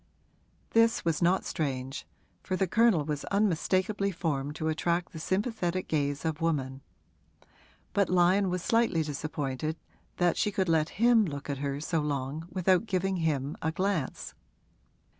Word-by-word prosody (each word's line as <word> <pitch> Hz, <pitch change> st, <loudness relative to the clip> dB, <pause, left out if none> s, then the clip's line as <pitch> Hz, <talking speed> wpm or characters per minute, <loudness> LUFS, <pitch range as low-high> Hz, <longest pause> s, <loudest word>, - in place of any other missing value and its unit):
This 230 Hz, -2 st, +3 dB
was 165 Hz, -1 st, 0 dB
not 180 Hz, +2 st, +3 dB
strange, 135 Hz, -2 st, -3 dB, 0.3 s
for 185 Hz, -, -2 dB
the 190 Hz, -, +1 dB
Colonel 210 Hz, -5 st, +3 dB
was 150 Hz, -1 st, -3 dB
unmistakably 200 Hz, 0 st, +1 dB
formed 150 Hz, -5 st, -2 dB
to 160 Hz, -, -3 dB
attract 170 Hz, +2 st, 0 dB
the 160 Hz, -, -7 dB
sympathetic 185 Hz, -1 st, -1 dB
gaze 145 Hz, -1 st, -1 dB
of 160 Hz, 0 st, -2 dB
woman; 135 Hz, -5 st, -1 dB, 1.1 s
but 200 Hz, -2 st, +2 dB
Lyon 185 Hz, +2 st, +4 dB
was 180 Hz, -1 st, -2 dB
slightly 225 Hz, -8 st, +2 dB
disappointed 150 Hz, 0 st, -3 dB, 0.4 s
that 175 Hz, -1 st, +2 dB
she 210 Hz, -, +1 dB
could 190 Hz, -3 st, 0 dB
let 160 Hz, -1 st, +2 dB
him 230 Hz, 0 st, +5 dB
look 145 Hz, -5 st, -4 dB
at 140 Hz, -, -4 dB
her 140 Hz, 0 st, -2 dB
so 160 Hz, +2 st, -1 dB
long 145 Hz, +2 st, -3 dB
without 185 Hz, +3 st, +2 dB
giving 190 Hz, 0 st, 0 dB
him 150 Hz, -4 st, -1 dB
a 160 Hz, -, 0 dB
glance. 185 Hz, -4 st, -2 dB
165 Hz, 145 wpm, -29 LUFS, 150-190 Hz, 1.1 s, him